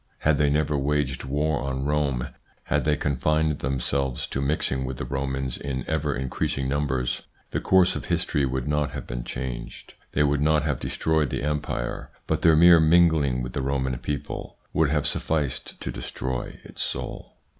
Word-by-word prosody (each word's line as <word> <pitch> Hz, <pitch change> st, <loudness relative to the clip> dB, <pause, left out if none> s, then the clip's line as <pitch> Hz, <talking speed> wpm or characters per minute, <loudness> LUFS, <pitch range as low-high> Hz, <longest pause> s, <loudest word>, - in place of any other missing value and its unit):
Had 80 Hz, -1 st, +3 dB
they 75 Hz, -1 st, +4 dB
never 75 Hz, 0 st, +1 dB
waged 70 Hz, -2 st, 0 dB
war 75 Hz, +2 st, 0 dB
on 65 Hz, 0 st, -2 dB
Rome, 70 Hz, -3 st, 0 dB, 0.3 s
had -, -, 0 dB
they 75 Hz, -, +3 dB
confined 75 Hz, +2 st, +1 dB
themselves 70 Hz, 0 st, -1 dB
to 65 Hz, -, -2 dB
mixing 70 Hz, -2 st, 0 dB
with 65 Hz, -1 st, -4 dB
the -, -, -4 dB
Romans 65 Hz, -2 st, -2 dB
in 65 Hz, -3 st, -3 dB
ever 75 Hz, -3 st, 0 dB
increasing 65 Hz, +1 st, -1 dB
numbers, 65 Hz, -3 st, 0 dB, 0.3 s
the -, -, 0 dB
course 95 Hz, -1 st, +4 dB
of -, -, -4 dB
history 70 Hz, -, 0 dB
would 65 Hz, 0 st, -1 dB
not 75 Hz, -1 st, 0 dB
have 70 Hz, -, -5 dB
been -, -, -4 dB
changed; -, -, -6 dB, 0.2 s
they 75 Hz, -, +3 dB
would 70 Hz, -1 st, +2 dB
not 75 Hz, 0 st, +3 dB
have 75 Hz, -5 st, -1 dB
destroyed 80 Hz, -3 st, 0 dB
the -, -, -3 dB
Empire, 75 Hz, -5 st, -2 dB, 0.2 s
but -, -, 0 dB
their 80 Hz, -2 st, +6 dB
mere 85 Hz, +1 st, +8 dB
mingling 80 Hz, -6 st, +4 dB
with 60 Hz, -, -5 dB
the -, -, -1 dB
Roman 65 Hz, -1 st, 0 dB
people 75 Hz, -1 st, -5 dB, 0.2 s
would 80 Hz, -2 st, +3 dB
have 75 Hz, -1 st, +1 dB
sufficed 75 Hz, -5 st, -2 dB
to -, -, -4 dB
destroy 65 Hz, -1 st, -4 dB
its -, -, -8 dB
soul. -, -, -4 dB
70 Hz, 175 wpm, -25 LUFS, 65-75 Hz, 0.3 s, mere